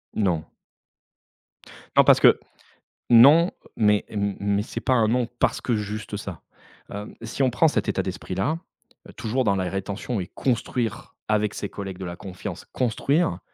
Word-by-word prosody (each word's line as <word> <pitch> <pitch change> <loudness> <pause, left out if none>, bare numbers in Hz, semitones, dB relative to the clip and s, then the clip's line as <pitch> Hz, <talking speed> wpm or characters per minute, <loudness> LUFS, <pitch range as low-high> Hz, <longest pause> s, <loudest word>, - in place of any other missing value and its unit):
Non. 90 -7 +1 1.5
Non, - - +9
parce - - +6
que - - +6 0.7
non, 145 +9 +7 0.2
mais 105 -2 +3
m 100 -2 -2
mais 100 0 +1
c'est 115 - -5
pas 130 - +1
un 115 -3 +3
non 120 +1 +1
parce - - +2
que 120 - 0
juste 105 0 -4
ça, 100 -5 -7 0.5
hem, 105 +1 -7
si 115 +4 -2
on 130 - +4
prend 125 +7 +3
cet 150 - 0
état - - 0
d'esprit-là, 150 +12 -3 0.5
heu, - - -13
toujours 120 +4 -1
dans 100 -4 +2
la 95 -1 -1
rétention 100 +4 -3
et 90 - -4
construire 120 -3 -2
avec 105 -1 +1
ses 100 - -5
collègues 95 -2 -7
de 95 - -6
la 85 0 -5
confiance. 95 0 -8
Construire, 130 - 0
105 Hz, 165 wpm, -24 LUFS, 100-125 Hz, 1.5 s, Non